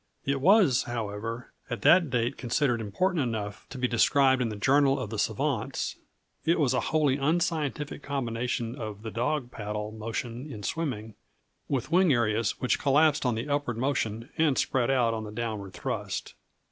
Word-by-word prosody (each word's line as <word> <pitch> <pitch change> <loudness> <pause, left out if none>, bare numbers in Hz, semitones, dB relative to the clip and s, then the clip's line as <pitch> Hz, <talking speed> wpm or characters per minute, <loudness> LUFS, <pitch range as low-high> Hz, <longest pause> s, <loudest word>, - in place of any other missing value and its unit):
It 140 -1 0
was, 185 - +5
however, 115 0 -4 0.2
at 120 - -4
that 175 -3 +6
date 125 +1 0
considered 125 -1 0
important 165 - 0
enough 110 -5 -4
to 135 - -8
be 125 0 +1
described 130 +2 +4
in 120 - 0
the 105 - -5
Journal 135 +5 +3
of 115 -5 -5
the 110 - -3
Savants. - - -1 0.5
It 165 +1 +2
was 135 -4 +3
a - - +2
wholly 150 -4 +2
unscientific 150 -1 -1
combination 120 -4 -2
of 110 -4 -7
the 110 - -5
"dog 125 +2 -1
paddle" 105 0 -4
motion 115 +5 -5
in 105 -4 -8
swimming, 115 -7 -3 0.6
with 135 +1 -2
wing 180 -1 +5
areas 115 -3 +1
which 125 - +1
collapsed 145 0 +3
on 120 - +1
the 115 +5 -3
upward 145 -5 -1
motion 115 -3 -1
and 155 -4 +3
spread 125 -2 +1
out 125 -4 +3
on 110 -1 -3
the 105 - -7
downward 105 -4 -4
thrust. - - -4
125 Hz, 170 wpm, -28 LUFS, 115-145 Hz, 0.6 s, that